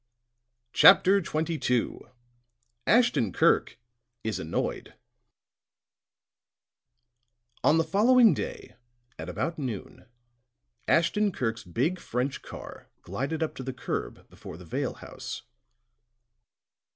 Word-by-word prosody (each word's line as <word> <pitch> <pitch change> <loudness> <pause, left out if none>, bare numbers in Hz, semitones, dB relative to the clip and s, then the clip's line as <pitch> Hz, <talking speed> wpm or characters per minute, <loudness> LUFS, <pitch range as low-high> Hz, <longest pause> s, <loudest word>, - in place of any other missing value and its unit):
CHAPTER 195 0 +7
XXII 155 -7 -1 0.9
ASHTON 230 - +3
KIRK - - +2 0.5
IS 110 -4 -2
ANNOYED 80 -1 -3 2.7
On 160 - +5
the 165 - +3
following 225 +8 +5
day, 465 -4 -6 0.4
at - - -6
about 165 -1 -3
noon, 120 -9 -6 0.8
Ashton 205 +5 +2
Kirk's 115 -8 -3
big 135 - -1
French 125 0 -3
car - - -10
glided 135 - -3
up 160 - -3
to - - -8
the 130 0 -4
curb 125 - -5
before - - -11
the 90 - -12
Vale 80 - -3
house. - - -8
155 Hz, 95 wpm, -27 LUFS, 120-195 Hz, 2.7 s, CHAPTER